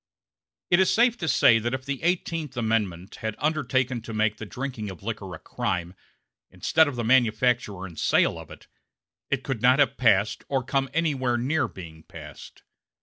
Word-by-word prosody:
It 175 - +5
is 190 - +4
safe 240 +1 +3
to 160 - -3
say 115 -6 +5
that 120 +3 -2
if 130 0 -8
the 140 -2 -4
Eighteenth 165 -5 -2
Amendment 105 -5 -1
had 110 -1 -4
undertaken 130 -5 0
to 115 0 -7
make 110 0 +1
the 110 - -7
drinking 125 -4 -5
of 95 0 -10
liquor 100 -5 -5
a - - -9
crime, 90 +2 -3 0.6
instead 160 -1 +2
of 145 - -4
the 120 - -3
manufacture 115 -4 +2
and 85 -4 -10
sale - - +2
of - - -11
it, - - -13 0.6
it 135 -1 -1
could 130 -5 -3
not 125 +1 +5
have 145 -4 +4
been 135 - -29
passed 105 -4 +2
or 135 -2 0
come 135 +1 -1
anywhere 135 -6 0
near 135 +4 0
being 80 -4 -11
passed. - - -12
125 Hz, 185 wpm, -25 LUFS, 105-140 Hz, 0.6 s, It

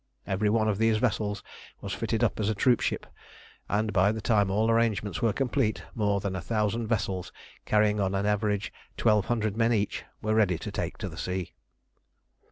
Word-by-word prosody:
Every 100 +2 0
one 110 0 +2
of 105 -1 0
these 115 -1 +3
vessels 105 -3 -1 0.4
was - - -5
fitted - - -1
up - - +1
as 105 -1 +1
a 110 - 0
troopship, 120 +3 +1 0.6
and 105 +1 0
by 95 +1 +4
the 110 - -4
time 105 -3 +2
all 110 +4 +2
arrangements 115 -3 +1
were 115 -3 +3
complete, 125 -1 0
more 100 -2 +1
than 95 -1 -3
a 95 - -3
thousand 110 +3 -1
vessels, 100 -5 -1 0.4
carrying 105 0 +3
on 95 -1 0
an 100 +1 0
average 105 -1 0 0.2
twelve 105 -3 +3
hundred 110 -3 -1
men 115 +1 +2
each, 105 -3 0 0.2
were 110 0 -1
ready 105 -6 +3
to - - -6
take - - -3
the - - -5
sea. 90 -1 -4
105 Hz, 180 wpm, -28 LUFS, 100-110 Hz, 0.6 s, by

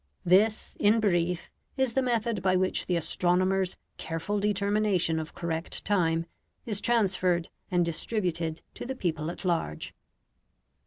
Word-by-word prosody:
This, 205 +5 +3
in 210 +2 +4
brief, 180 -4 0 0.3
is 265 -3 +1
the 265 - +2
method 235 -4 0
by 185 0 +3
which 185 0 +1
the 180 - +1
astronomer's 180 +3 +1 0.2
careful 165 +6 -2
determination 200 -4 +1
of 160 0 -7
correct 165 -1 -3
time 165 -5 +2 0.4
is 210 -3 -2
transferred 185 -7 +2 0.2
and 175 -1 +2
distributed 170 -2 -2
to - - -7
the 265 - -3
people 160 -7 -2
at 175 - -7
large. 165 - -1
185 Hz, 135 wpm, -28 LUFS, 170-210 Hz, 0.4 s, in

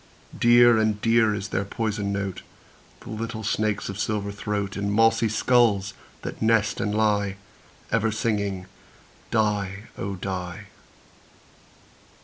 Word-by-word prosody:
Dear 120 -1 +6
and 110 -1 +1
dear 115 -1 +3
is 100 -2 -5
their 95 - -1
poisoned 105 0 -2
note, 100 -2 -3 0.6
The - - -9
little 110 0 -4
snakes' 105 -1 0
of 100 0 -6
silver 105 -1 -1
throat, 100 -1 -3
In 100 0 -2
mossy 115 +2 +3
skulls 110 -3 +2 0.3
that - - -6
nest 115 0 +2
and 105 0 -1
lie, 105 -2 +1 0.6
Ever 115 -1 +2
singing 100 -4 -1 0.6
"die, 105 -3 0 0.2
oh! 100 0 -3
die." 90 -2 -5
105 Hz, 125 wpm, -25 LUFS, 100-110 Hz, 0.6 s, Dear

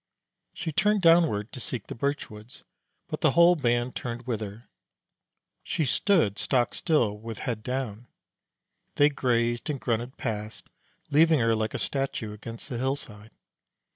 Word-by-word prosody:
She 165 - -3
turned 210 +5 +2
downward 165 -11 +4
to - - -7
seek 125 0 0
the - - -7
birch 140 +5 -2
woods, 105 +2 -12 0.4
but - - -5
the - - +3
whole 170 +1 +6
band 120 -4 0
turned 120 0 -5
with 115 -4 -2
her. 105 +2 -8 0.9
She 160 - -1
stood 155 - +2
stock 125 -3 +1
still, 115 -11 +1
with 115 0 -7
head 115 -3 -3
down. 120 -2 -4 0.9
They 145 +1 +5
grazed 120 -2 0
and 145 -3 -2
grunted 120 +2 -2
past, 105 -4 -5 0.4
leaving 160 +1 +5
her 115 -1 +3
like 110 0 -2
a - - 0
statue 135 -6 -3
against 115 +2 -7
the 125 -5 -4
hillside. 120 -5 -3
120 Hz, 150 wpm, -27 LUFS, 110-145 Hz, 0.9 s, whole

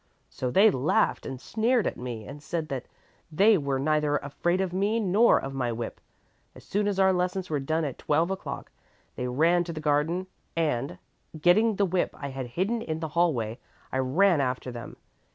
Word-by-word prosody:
So 130 - -3
they 200 - +6
laughed 135 -2 +1
and 130 -2 -6
sneered 225 - +1
at - - -1
me 120 -3 -6
and 145 +1 -9
said 155 0 -3
that 130 -2 -4 0.4
they 205 +8 +5
were 140 -6 0
neither 150 +1 +1
afraid 170 +6 -1
of 190 -2 -1
me 205 +4 +1
nor 210 +3 +4
of 135 - -6
my 125 -3 -1
whip. 115 0 -5 0.5
As - - -13
soon 205 +1 -1
as 200 -2 -1
our 190 0 +5
lessons 180 0 -1
were 150 - +1
done 155 +4 -1
at 135 - -5
twelve 160 +5 +1
o'clock, 190 - -5 0.4
they 125 - -3
ran 165 +7 +3
to 170 - -5
the 155 - -5
garden 155 +4 +1 0.3
and, 145 -5 0 0.4
getting 210 +7 +4
the 200 - +2
whip 185 -1 -1
I 140 -1 -5
had 135 -2 -5
hidden 220 +6 0
in 160 -7 -3
the 160 -1 -4
hallway, 135 -9 0 0.3
I 130 - -1
ran 155 +5 +3
after 125 -1 -2
them. 120 -1 -8
160 Hz, 190 wpm, -27 LUFS, 135-190 Hz, 0.5 s, they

